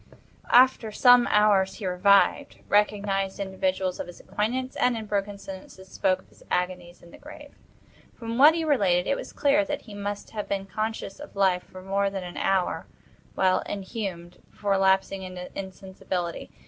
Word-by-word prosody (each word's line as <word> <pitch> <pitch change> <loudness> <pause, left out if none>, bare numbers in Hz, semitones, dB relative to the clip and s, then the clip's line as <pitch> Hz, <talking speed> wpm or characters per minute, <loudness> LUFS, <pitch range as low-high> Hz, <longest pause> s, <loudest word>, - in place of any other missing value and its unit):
After 245 -3 +5
some 245 +2 +6
hours 200 -2 +3
he 200 - -7
revived, 200 +9 +2
recognized 200 -2 +1
individuals 190 -1 -2
of - - -4
his 175 - -12
acquaintance, 255 +5 -3
and, 250 -2 +2
in 220 - -6
broken 205 -1 -2
sentences 190 -1 -11
spoke 185 -1 0
of - - -28
his - - -23
agonies 180 -1 -3
in 170 - -15
the - - -14
grave. 295 0 -12 0.6
From 230 0 -5
what 300 +4 +8
he 330 - -1
related, 195 - +2
it 275 - +1
was - - -7
clear 290 +1 +2
that 295 -1 -4
he 215 - -12
must 205 0 -5
have 210 -2 -5
been 195 -1 -2
conscious 215 +1 -4
of 295 - -11
life 190 -2 +2
for 185 0 -12
more 195 +1 0
than 195 -1 -5
an 175 -1 -8
hour, 190 -2 0 0.5
while 185 -1 +3
inhumed, 190 -4 -6
before 200 -1 -1
lapsing 190 0 +2
into 185 -1 -8
insensibility. 190 -2 -5
195 Hz, 170 wpm, -26 LUFS, 190-220 Hz, 0.6 s, what